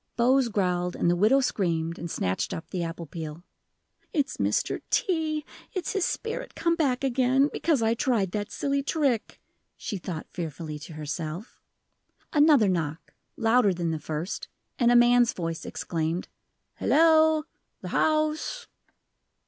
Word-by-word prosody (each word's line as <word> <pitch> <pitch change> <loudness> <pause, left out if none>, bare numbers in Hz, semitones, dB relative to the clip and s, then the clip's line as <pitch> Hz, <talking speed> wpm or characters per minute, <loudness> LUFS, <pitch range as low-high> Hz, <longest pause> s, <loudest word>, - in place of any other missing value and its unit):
Bose 255 +2 +3
growled, 180 -4 0
and 170 - +2
the - - +2
widow 220 +9 +4
screamed 170 -8 -1
and 170 - -5
snatched 95 - -1
up 160 - -7
the 180 - -2
apple 170 0 -4
peel. 160 +1 -7 0.7
"It's 290 -7 -1
Mr. - - 0
T. 315 -7 0 0.3
it's 370 -2 -2
his 390 -3 +1
spirit 480 +2 -4
come 335 0 +1
back 275 -6 0
again, 265 +2 +2
because 300 -8 +1
I 225 +1 +3
tried 230 -7 0
that 205 0 -3
silly 280 0 0
trick," 275 -6 -1 0.4
she 210 - -4
thought 170 -3 -5
fearfully 160 -2 -5
to 160 +3 -10
herself. 155 - -6 0.7
Another 295 -7 +5
knock 165 -3 -2 0.2
louder 225 -4 +3
than 170 -1 -1
the 160 - -2
first, 155 +5 -4 0.3
and 240 -1 +4
a - - +5
man's 240 0 +5
voice 165 -2 -4
exclaimed: 165 +1 -2 0.5
"Hello 315 -1 +4 0.4
the - - -6
house!" 310 +10 0
225 Hz, 140 wpm, -27 LUFS, -, 0.7 s, Another